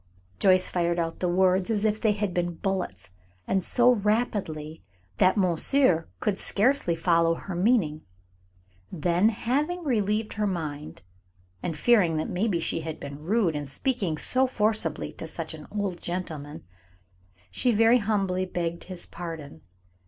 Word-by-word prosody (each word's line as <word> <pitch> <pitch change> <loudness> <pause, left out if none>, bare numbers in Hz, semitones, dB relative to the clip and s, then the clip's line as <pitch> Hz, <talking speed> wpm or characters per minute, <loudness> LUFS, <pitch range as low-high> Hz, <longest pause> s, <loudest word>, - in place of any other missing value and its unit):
Joyce 185 -1 +4
fired 170 -1 0
out 165 -1 -2
the 180 - 0
words 185 +1 +2
as 215 -1 0
if 215 0 0
they 220 -2 +3
had 205 -3 -2
been 175 -1 -1
bullets, 130 - -3 0.4
and 190 - +1
so 245 +6 +4
rapidly 205 -9 -1 0.4
that 185 +3 +4
monsieur 185 - +2
could 200 -2 -1
scarcely 210 -5 +3
follow 165 0 +2
her 190 - -7
meaning. 175 -5 +1 0.9
Then, 175 +4 +2
having 290 +11 -1
relieved 215 -5 0
her 210 0 -1
mind, 155 - -5 0.6
and 165 -3 -3
fearing 180 -5 +3
that 155 - -2
maybe 185 -1 0
she 165 0 -1
had 160 -1 -6
been 140 0 -8
rude 185 -1 +1
in 145 -1 -4
speaking 185 - -1
so 260 +10 +2
forcibly 215 - -1
to 160 - -7
such 160 0 -5
an 155 -1 -10
old 200 -4 -3
gentleman, 160 -4 -5 0.9
she 245 - +1
very 230 +3 +5
humbly 195 -4 0
begged 170 -1 -3
his 185 -2 -5
pardon. 160 - -8
185 Hz, 145 wpm, -26 LUFS, 165-215 Hz, 0.9 s, very